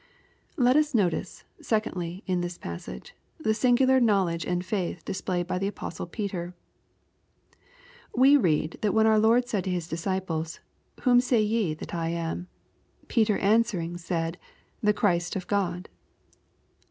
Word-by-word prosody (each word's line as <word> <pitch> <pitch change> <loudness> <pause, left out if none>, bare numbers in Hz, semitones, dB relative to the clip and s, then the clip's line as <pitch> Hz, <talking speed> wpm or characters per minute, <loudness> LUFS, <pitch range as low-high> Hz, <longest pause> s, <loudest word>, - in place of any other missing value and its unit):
Let 250 0 +4
us 300 -3 +2
notice, 185 -3 0 0.2
secondly, 185 -4 -2
in 180 -2 0
this 175 0 -4
passage, 85 -7 -8 0.3
the 220 -8 +1
singular 260 +3 +4
knowledge 195 -8 +2
and 180 0 -1
faith 185 -4 -3
displayed 180 -2 -2
by 180 +1 -2
the 195 - 0
Apostle 200 - -6
Peter. 180 -3 -4 1.6
We 265 +4 +6
read, 160 - +1
that 210 -1 +1
when 220 0 +5
our 220 -1 +5
Lord 235 +3 +4
said 210 -6 -1
to - - -1
His 175 -3 -2
disciples, 170 -1 -3 0.4
'^ - - -18
Whom 245 -2 +5
say 245 -3 +2
ye 210 -7 0
that 155 - -9
I 165 -1 -1
am? 170 +1 -3 0.6
Peter 220 -3 +2
answering, 200 -5 +1
said, 165 0 -3 0.4
the 210 - +4
Christ 175 -3 +1
of 185 -2 -3
God." 185 -2 -1
190 Hz, 145 wpm, -27 LUFS, 175-220 Hz, 1.6 s, We